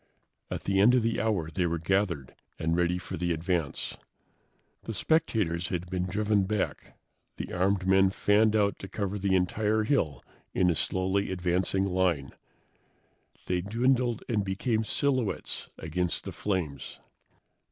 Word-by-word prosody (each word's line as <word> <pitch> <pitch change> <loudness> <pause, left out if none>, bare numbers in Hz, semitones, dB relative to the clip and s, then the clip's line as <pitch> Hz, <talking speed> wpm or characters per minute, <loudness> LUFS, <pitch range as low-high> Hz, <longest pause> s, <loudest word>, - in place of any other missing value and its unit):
At - - -4
the 95 0 +1
end 115 +6 +6
of 125 - +3
the 115 0 0
hour 95 -8 0
they 85 +3 0
were 85 0 -1
gathered 85 -5 0 0.2
and 80 +1 0
ready 90 0 +1
for 90 - -6
the 85 +1 -1
advance. 85 -2 -1 0.9
The 115 - -4
spectators 105 - +1
had 90 0 -4
been 90 0 -1
driven 105 +1 +1
back. 105 0 -3 0.4
The - - -5
armed 95 +1 +1
men 95 0 +5
fanned 105 +2 +3
out 100 -2 +2
to 95 - -7
cover 100 0 -3
the 95 -1 +2
entire 105 +4 +1
hill 80 - 0 0.3
in 90 -1 +4
a - - +2
slowly 95 +5 0
advancing 95 +1 +1
line. 90 -7 0 1.1
They 90 -1 0
dwindled 120 +3 +1
and 105 -4 +1
became 110 +4 0
silhouettes 130 -1 -1
against 85 +2 -2
the - - -6
flames. 80 -10 -3
95 Hz, 145 wpm, -28 LUFS, 90-105 Hz, 1.1 s, end